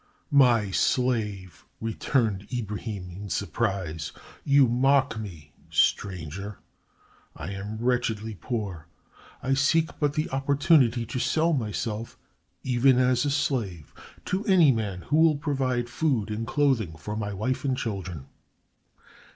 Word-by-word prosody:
"My 120 -8 +4
slave!" 105 -6 0 0.2
returned 110 -3 -1
Ibrahim, 105 -5 -4
in 100 +3 -8
surprise. 95 -4 -2 0.3
"You 140 -2 +5
mock 130 0 +2
me, 80 -8 -9 0.2
stranger. 95 +1 0 0.8
I 80 +6 -6
am 100 +2 -5
wretchedly 115 -2 -1
poor. 100 - -5 0.6
I 135 +2 +1
seek 155 +4 +2
but 145 -2 +1
the 155 0 0
opportunity 135 -3 +3
to 120 +3 -4
sell 165 +5 +2
myself, 115 -2 -3 0.5
even 130 0 +4
as 125 +1 +3
a - - +1
slave, 115 - -2 0.3
to 190 +3 -1
any 175 -7 +6
man 105 -6 -2
who 145 - +1
will 160 -2 +5
provide 135 -5 -1
food 120 -5 0
and 110 +2 -3
clothing 130 - +1
for 105 +6 -5
my 105 -1 -3
wife 110 +7 -2
and 130 -2 0
children." 95 - -4
115 Hz, 125 wpm, -26 LUFS, 100-135 Hz, 0.8 s, any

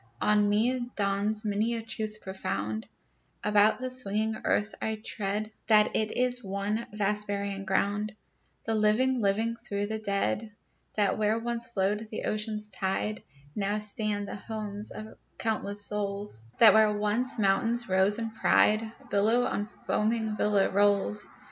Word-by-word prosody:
On 210 -1 +3
me 240 +4 +1
dawns 205 +2 0
many 215 +3 0
a 225 - -4
truth 215 -1 -4
profound 110 - -4 0.6
About 210 +2 +4
the 255 0 -3
swinging 220 -3 0
earth 210 +1 +1
I 220 - 0
tread, 215 0 -3 0.2
That 215 -1 +5
it 215 -1 +1
is 250 0 +2
one 200 +3 -2
vast 210 0 0
burying 200 -1 -3
ground, 205 +2 0 0.5
The 225 - 0
living 220 +5 +2
living 220 +3 +1
through 205 -3 -3
the 220 +1 -3
dead, 205 +1 -1 0.4
That 205 0 +2
where 215 +1 +2
once 235 +1 -3
flowed 210 -1 -1
the 215 - -5
ocean's 215 0 -2
tide, 195 +2 -2 0.3
Now 205 0 0
stand 210 -1 -1
the - - -5
homes 210 0 -5
of 215 0 -9 0.2
countless 205 -2 -1
souls; 200 - -3
That 220 -3 +9
where 220 -1 +5
once 215 +5 0
mountains 230 +4 +1
rose 190 +2 +2
in 225 -1 -3
pride, 220 0 +3 0.2
Billow 220 +5 +3
on 205 - -1
foaming 220 0 -1
billow 205 -2 +2
rolls. 200 - +2
210 Hz, 145 wpm, -28 LUFS, 200-220 Hz, 0.6 s, That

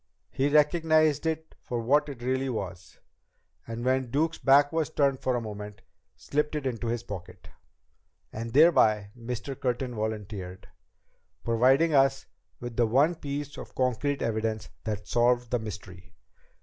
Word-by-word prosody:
He 135 +2 +1
recognized 155 0 +3
it 160 0 -3
for 120 - -4
what 145 +6 +2
it 125 -4 -8
really 130 +1 0
was, 95 -5 -6 0.7
and 115 +1 -5
when 130 -1 +1
Duke's 160 +5 0
back 140 +1 +5
was 160 -1 0
turned 140 -4 +1
for 130 - 0
a 120 - -1
moment, 105 -2 -8 0.3
slipped 150 +1 -2
it 150 -2 -3
into 120 -2 -2
his 115 0 -2
pocket." 95 -3 -9 0.8
"And 115 +1 -5
thereby," 110 -9 +4
Mr. 125 +2 -5
Curtin 125 -2 -2
volunteered, 105 -4 -5 0.8
"providing 130 +8 +3
us 135 -1 +3 0.3
with 120 -1 -7
the 120 -1 +3
one 140 +9 +3
piece 145 -3 -5
of - - -10
concrete 130 +3 0
evidence 110 -1 -2 0.2
that 105 -2 -4
solved 120 +1 +2
the 120 - +1
mystery." 95 -4 -9
125 Hz, 145 wpm, -28 LUFS, 110-145 Hz, 0.8 s, back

